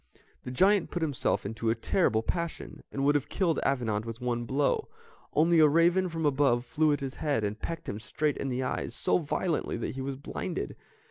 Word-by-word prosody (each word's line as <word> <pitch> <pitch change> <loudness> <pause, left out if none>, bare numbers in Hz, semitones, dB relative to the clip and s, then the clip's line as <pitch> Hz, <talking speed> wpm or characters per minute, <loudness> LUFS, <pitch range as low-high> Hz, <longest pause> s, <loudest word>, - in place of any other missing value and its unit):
The - - -4
giant 190 +8 +3
put 175 - -2
himself 145 -9 0
into 110 +2 -2
a 115 - +2
terrible 115 - +1
passion, 170 +5 -4
and 135 0 -1
would 145 - +5
have 145 -2 0
killed 175 -5 +1
Avenant 115 -6 0
with 115 0 -7
one 120 -1 -1
blow, 140 +3 0 0.4
only 165 +2 +4
a 155 - +8
raven 170 +4 +3
from 165 -1 -3
above 135 -4 +2
flew 155 +4 +2
at 145 - 0
his 135 -1 -4
head, 140 -8 -1
and 105 +1 -3
pecked 165 0 -5
him 100 - -4
straight 145 +7 -1
in 135 - -2
the 130 +1 -1
eyes, 125 - -3
so - - +2
violently 165 +1 -1
that - - -3
he 135 - -5
was 135 0 -3
blinded. 135 - -4
140 Hz, 205 wpm, -29 LUFS, 120-160 Hz, 0.4 s, a